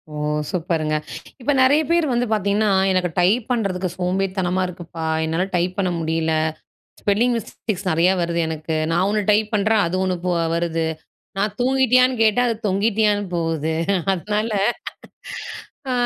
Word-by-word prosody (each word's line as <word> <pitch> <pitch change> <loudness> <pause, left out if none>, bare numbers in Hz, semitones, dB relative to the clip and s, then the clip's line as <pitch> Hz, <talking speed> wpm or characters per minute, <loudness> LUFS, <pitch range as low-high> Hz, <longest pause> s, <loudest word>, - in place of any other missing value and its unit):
ஓ! - - -5 0.3
சூப்பர்ங்க. 160 -3 -1 0.5
இப்ப 290 - +1
நெறைய 285 +4 +5
பேர் 340 -1 +3
வந்து 245 0 +1
பாத்தீங்கன்னா 205 +1 +1 0.2
எனக்கு 180 -1 +1
டைப் 210 +6 +3
பண்றதுக்கு 190 -6 -1
சோம்பேறித்தனமா 185 0 -1
இருக்குப்பா, 170 -2 -7 0.2
என்னால 165 +4 0
டைப் 180 +1 0
பண்ண 185 -2 +1
முடியல, 160 0 0 0.7
ஸ்பெல்லிங் 230 +5 +2
மிஸ்டேக்ஸ் 205 -2 -5
நெறைய 170 +4 +3
வருது 170 0 -1
எனக்கு, 160 0 -3 0.2
நான் 175 +3 +2
1 210 0 +1
டைப் 210 +1 +2
பண்றேன் 210 +1 +3
அது 185 - -2
1 185 -1 -1 0.4
வருது. 165 -1 -1 0.5
நான் 205 0 -1
தூங்கிட்டியான்னு 255 -1 +3
கேட்டா 220 +2 +3
அது 230 - 0
தொங்கிட்டியான்னு 205 +1 +1
போகுது. 160 -2 -1 0.4
அதனால 210 +4 -2 1.4
அ - - 0
190 Hz, 135 wpm, -21 LUFS, 170-220 Hz, 1.4 s, நெறைய